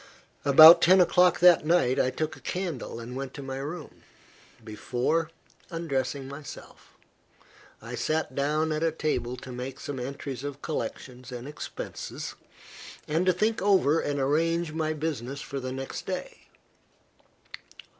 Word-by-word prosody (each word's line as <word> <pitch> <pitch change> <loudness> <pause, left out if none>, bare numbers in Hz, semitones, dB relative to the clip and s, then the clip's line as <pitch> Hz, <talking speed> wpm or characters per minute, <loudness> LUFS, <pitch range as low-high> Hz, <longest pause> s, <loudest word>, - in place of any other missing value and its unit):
About 155 +4 +10
ten 185 +2 +6
o'clock 180 -1 +4
that 175 -3 +7
night, 155 -6 +2
I 130 - +3
took 155 +4 -3
a - - -15
candle 175 -10 -4
and 120 +2 -8
went 135 0 -6
to 140 - -7
my 135 0 -5
room. 150 +4 -7 0.6
Before 125 +9 -1 0.4
undressing 140 -5 -3
myself, 140 +2 -11 0.9
I 115 +1 -8
sat 155 +4 -1
down 150 +3 0
at 155 0 -1
a 165 0 +2
table 140 -6 -2
to 130 - -9
make 125 +2 -6
some 140 -2 -5
entries 135 0 -6
of 145 0 -6
collections 130 -4 -5
and 125 +1 -7
expenses, 150 - -7 0.7
and 165 +5 0
to - - +7
think 215 +5 0
over 185 -6 +3
and 145 -1 -2
arrange 165 +4 +1
my 155 -1 -1
business 140 -4 -4
for 140 -1 -5
the 130 -1 -5
next 135 +1 -6
day. - - -6
145 Hz, 145 wpm, -27 LUFS, 130-165 Hz, 0.9 s, About